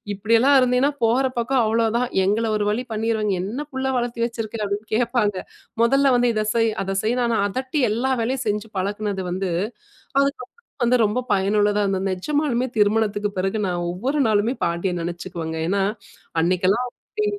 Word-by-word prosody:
இப்படியெல்லாம் 230 +7 +4
இருந்தின்னா 255 +3 +3
போற 240 +4 +3 0.2
பக்கம் 250 +1 +2
அவ்வளோதான்! 230 +2 +1 0.2
எங்கள 215 +4 +1
ஒரு 205 - -1
வழி 240 +4 -2
பண்ணிருவாங்க, 215 -2 0
"என்ன 230 +9 -4
புள்ள 265 0 -2
வளர்த்தி 240 -1 -2
வச்சுருக்குற?", 225 -2 -5
அப்டின்னு 205 +2 -4
கேட்பாங்க. 230 -4 +1 0.5
மொதல்ல 275 +2 +4
வந்து 245 0 +3
இத 215 0 0
செய், 225 -1 +3
அத 195 0 -2
செய்ன்னு, 240 +3 +1
ஆனா 230 -1 +1
அதட்டி 260 +6 -2
எல்லா 250 +5 0
வேலையும் 255 +1 -1
செஞ்சு 210 +2 -1
பழக்குனது 200 0 -2
வந்து, 185 0 -2 0.7
அதுக்கப்புறம் 280 - -3 0.3
வந்து 250 +1 +4
ரொம்ப 210 +4 0
பயனுள்ளதா 205 +1 +2
இருந்தது. 195 0 -1
நெஜமாலுமே 255 +5 0
திருமணத்துக்கு 210 0 +2
பிறகு 195 +3 0
நான் 175 -1 -2
ஒவ்வொரு 255 +12 -2
நாளுமே 220 +4 +2
பாட்டிய 170 +2 -1
நினைச்சுக்குவேங்க. 170 -1 -5
ஏன்னா 195 0 +1 0.6
அன்னைக்கெல்லாம் 185 +7 +2
அவுங்க 245 - -11
அப்டி 425 0 -1
220 Hz, 155 wpm, -22 LUFS, 200-245 Hz, 0.7 s, இப்படியெல்லாம்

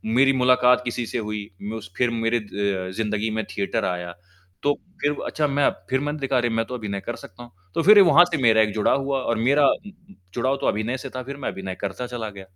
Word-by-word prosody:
मेरी 135 +2 +5
मुलाकात 125 -1 +4
किसी 120 0 -2
से - - -3
हुई। 105 -1 -4
मैं 105 +2 -5
उस 100 -5 -10
फ़िर 125 - +2
मेरी 115 0 0
अ, 100 -3 -3
ज़िंदगी 105 +1 -2
में 110 0 -2
थिएटर 100 -1 -2
आया। 90 -1 -3 0.5
तो 145 - +3 0.3
फ़िर 145 0 +1
अच्छा 150 -1 0
मैं 140 0 +2 0.2
फ़िर 130 0 +1
मैंने 145 +1 -3
देखा 135 -1 0
अरे 120 -1 +1
मैं 115 0 0
तो 125 - -6
अभिनय 105 -4 -4
कर 120 - -3
सकता 120 - -12
हूँ। 120 - -14 0.2
तो 165 - +1
फ़िर 205 +3 +8
वहाँ 175 -2 +7
से 155 - 0
मेरा 110 -2 +5
एक 110 -1 +1
जुड़ाव 110 +6 +2
हुआ 135 -1 -1
और 115 -2 -1
मेरा 140 +5 +4
उम 205 - -1
उम, 195 0 -20 0.2
जुड़ाव 130 +3 0
तो - - 0
अभिनय 110 +5 -1
से 135 +1 -7
था 130 - -4
फ़िर 140 +2 -7
मैं 140 - -3
अभिनय 95 -1 -6
करता 100 +6 -4
चला 120 -3 -5
गया। 100 -2 -11
120 Hz, 245 wpm, -23 LUFS, 105-135 Hz, 0.5 s, फ़िर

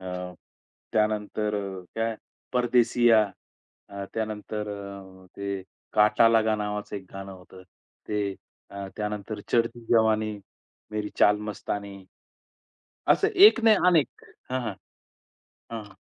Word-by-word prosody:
अ, 95 - -9 0.9
त्यानंतर 105 0 0 0.4
काय 115 0 -1 0.4
परदेशीया 120 -2 +4 0.7
अ, 100 0 -6
त्यानंतर 110 -1 -3
अ, 100 -2 -9
ते 100 -1 -3 0.3
काटा 105 +2 +5
लगा 110 -1 +3
नावाचं 105 0 -4
एक 95 - -8
गाणं 95 0 -7
होतं. 95 0 -14 0.5
ते 105 -2 -1 0.4
अ, 100 -1 -6
त्यानंतर 105 0 -4
चढती 115 0 +1
जवानी, 110 -2 +3 0.5
मेरी 105 -1 -3
चाल 105 0 +5
मस्तानी 100 -1 -5 1.1
असं 405 - +3
एक 390 - +8
नाही 220 -1 +7
अनेक 165 -6 +2 0.3
हां, 130 0 0 1.1
हां. 110 -3 -7
105 Hz, 105 wpm, -26 LUFS, 100-115 Hz, 1.1 s, एक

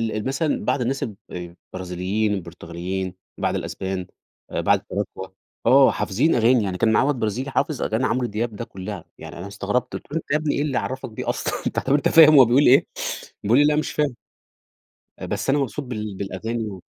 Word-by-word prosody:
ال 105 - -3
مثلًا 140 +4 -1
بعض 135 - +1
الناس 135 +3 -1
الب 110 - -5 0.2
البرازيليين، 90 +4 -3
البرتغاليين، 90 +1 -5 0.2
بعض - - 0
الأسبان، 95 -1 -4 0.4
آآ، - - -1
بعض - - +3
التراكوة، 95 0 -5 0.3
آه 130 +2 +7
حافظين 130 +12 +1
أغاني، 120 0 +4
يعني 95 -2 -2
كان 110 +4 +3
معايا 120 +5 +3
واد 145 - +2
برازيلي 120 +6 -2
حافظ 150 0 0
أغاني 110 +4 0
عمرو 125 -1 0
دياب 110 +1 -3
ده 115 - -5
كلّها، 95 -2 -7
يعني 80 +2 -9
أنا 90 +3 -6
استغرت 105 +4 -2
قلت - - -8
له: 160 - -1
"أنت 165 - -6
يا 150 - +4
ابني 155 -1 -1
إيه - - 0
اللي 145 -3 0
عرفك 130 0 -3
بيه 110 - -5
أصلًا؟! - - -2
طب - - +2
أنت 145 -1 +3
فاهم 155 -2 +8
هو 135 - +9
بيقول 125 +5 +4
إيه؟" 130 +3 +6 0.6
بيقول 110 +5 +4
لي: 145 - +6
"لأ، 150 0 +3
مش 155 - -1
فاهم.". 145 -4 0 1.0
آآ، - - -5
"بس 105 +5 -2
أنا 145 - +3
مبسوط 140 +2 -2
بال 110 -4 -5
بالأغاني 110 +3 -3
و" 95 -2 -8
115 Hz, 200 wpm, -23 LUFS, 95-135 Hz, 1.0 s, هو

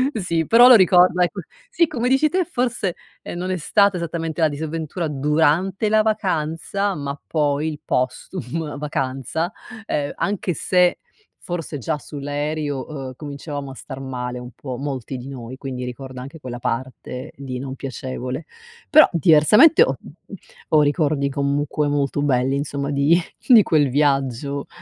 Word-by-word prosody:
Sì 170 -6 -1
però 240 +2 +8
lo 255 - +10
ricorda 180 -2 +5
ecco, 175 - -2 0.3
sì 355 -8 +3
come 245 -2 -1
dici 270 +4 +3
te 370 +4 +1
forse, 245 - -1 0.3
ehm, - - -7
non 185 +1 -3
è 185 - -1
stata 200 +3 +3
esattamente 165 -1 -3
la 160 - +4
disavventura 160 +3 -4
durante 155 +8 +1
la 215 0 +4
vacanza 195 -2 -1
ma 140 -1 -5
poi 150 -1 0
il 150 -2 -7
postum 145 +3 -3
vacanza, 145 - -2 0.3
ehm, 145 -8 -2
anche 200 -2 -1
se 180 +3 +2 0.4
forse 165 -4 -5
già 150 +5 -2 0.3
sull'aereo, 145 -1 -2
uhm, 135 -4 -6
cominciavamo 145 0 -6
a - - -10
star 135 0 -9
male 125 -2 -5
un 125 0 -9
po' 130 -3 -6
molti 135 -1 -4
di 125 +1 -9
noi, 130 -2 -8
quindi 130 -2 -5
ricordo 125 +1 -7
anche 140 +5 -10
quella 125 -3 -7
parte 130 +3 -4
di 130 -2 -6
non 130 0 -5
piacevole. 130 +1 -5 0.4
Però 310 0 +8
diversamente 175 - +6
ho - - 0 0.7
ho 155 -1 +5
ricordi 145 -1 +1
comunque 145 +1 -1
molto 145 0 0
belli 135 -1 +1
insomma 140 0 -3
di 145 +5 +3 0.3
di 235 -5 +8
quel 150 -6 +2
viaggio. 140 0 0
150 Hz, 150 wpm, -21 LUFS, 135-175 Hz, 0.7 s, lo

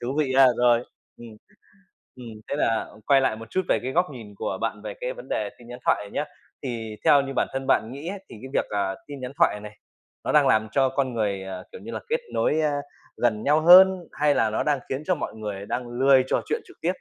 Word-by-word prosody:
Thú 125 +3 -3
vị 140 -4 +1
ha, 135 0 +8
rồi. 120 -1 +4 0.3
Ừm. 120 - -11 0.9
Ừm. 125 -2 -10 0.2
Thế - - -1
là 115 -6 0 0.2
quay 135 -1 +5
lại 130 - +1
một 115 0 -11
chút 185 - 0
về - - +3
cái 130 - -2
góc 175 +5 +2
nhìn 110 -6 -11
của - - -3
bạn - - -2
về - - -6
cái - - -2
vấn - - -11
đề - - -1
tin 120 - -15
nhắn 125 0 -9
thoại - - +4
này 100 - -11
nhá, 150 - -2 0.4
thì 115 -4 -5
theo 140 - +6
như 135 0 -5
bản - - +1
thân 135 0 -4
bạn 110 - +2
nghĩ 140 +5 -8
ấy, 200 - -5
thì - - -10
cái 130 - -7
việc, - - 0
à, 100 -2 -1
tin 145 -1 -8
nhắn 130 0 -6
thoại 105 - +3
này 105 0 -10 0.5
nó - - 0
đang - - +5
làm 110 0 +3
cho 135 +1 +3
con 130 -1 -1
người, 100 -4 -1
à, 95 -1 -7
kiểu - - -10
như 230 - -8
là, - - -4
kết 470 - +1
nối, 155 - +1
a, 155 -1 +1 0.5
gần 110 -3 0
nhau 150 +2 +3
hơn 180 +1 +7
hay 145 -1 +2
là 110 - +2
nó 110 - -1
đang 145 -3 +1
khiến 135 +3 -3
cho 185 - +2
mọi - - -5
người 105 -2 -6
đang 125 +2 -3
lười 130 +2 +4
trò - - +1
chuyện 450 +1 -1
trực 370 - -17
tiếp? 165 - -2
130 Hz, 260 wpm, -25 LUFS, 110-150 Hz, 0.9 s, ha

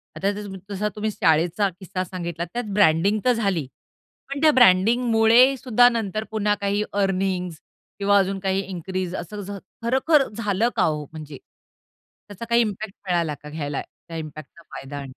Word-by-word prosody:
आता 195 +6 0
जस 205 0 -6 0.2
जसा 205 +1 -2
तुम्ही 215 +1 -2
शाळेचा 175 +4 +2
किस्सा 185 -1 -4
सांगितला 170 -2 -5
त्यात 245 - -2
ब्रँडिंग 200 +2 +3
तर 250 - +5
झाली, 195 - -1 0.6
पण 280 +1 -4
त्या 315 -1 +6
ब्रँडिंगमुळे 235 +2 +5
सुद्धा 245 -1 +4
नंतर 215 -3 -2
पुन्हा 210 -1 +1
काही 200 +1 0
अर्निन्ग्स 190 -4 -1 0.4
किंवा 200 0 +4
अजून 195 0 -1
काही 190 0 0
इन्क्रीज 185 0 -4
असं 205 -1 -6 0.3
खरोखर 265 +4 +3
झालं 210 +1 0
का 210 - +2
हो? 150 -1 0
म्हणजे 155 -3 -9 0.9
त्याचा 205 +3 -8
काही 235 0 +4
इम्पॅक्ट 210 -2 -3
मिळाला 170 -4 0
का 150 - -8
घ्यायला 145 -2 -4
त्या 165 - -12
इम्पॅक्टचा 155 +1 -9
फायदा? 140 +1 -7
195 Hz, 150 wpm, -23 LUFS, 175-220 Hz, 0.9 s, त्या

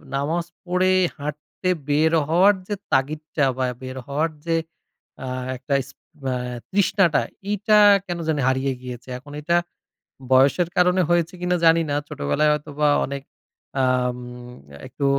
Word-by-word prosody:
নামাজ 160 +5 -1 0.2
পড়ে 180 +1 +2 0.3
হাঁটতে 150 +5 -5 0.2
বের 155 +2 +3 0.2
হওয়ার 180 +6 +5
যে 210 - -2 0.2
তাগিদটা 150 +2 0
বা 130 - +1 0.2
বের 130 0 -7
হওয়ার 150 +4 0 0.2
যে 165 -1 +1 0.7
আ - - -5 0.3
একটা 130 +3 -4
ইস 135 - -15 0.4
অ্যা 130 -1 0 0.4
তৃষ্ণাটা, 195 -4 +3 0.3
এইটা 210 +1 +3 0.3
কেনো 175 -1 -4
জানি 155 -3 +1
হারিয়ে 130 +1 +1
গিয়েছে। 125 0 -8
এখন 145 +3 -14
এইটা 170 +3 +2 0.7
বয়সের 140 +7 +4
কারণে 180 +1 +4
হয়েছে 175 0 +2
কিনা 180 0 +1
জানি 165 0 +6
না। 145 - 0
ছোটবেলায় 75 - +1
হয়তোবা 150 0 -1 0.2
অনেক 140 0 -6 0.6
আম 125 -1 +1 0.7
একটু 140 +2 -4
150 Hz, 135 wpm, -23 LUFS, 135-175 Hz, 0.7 s, জানি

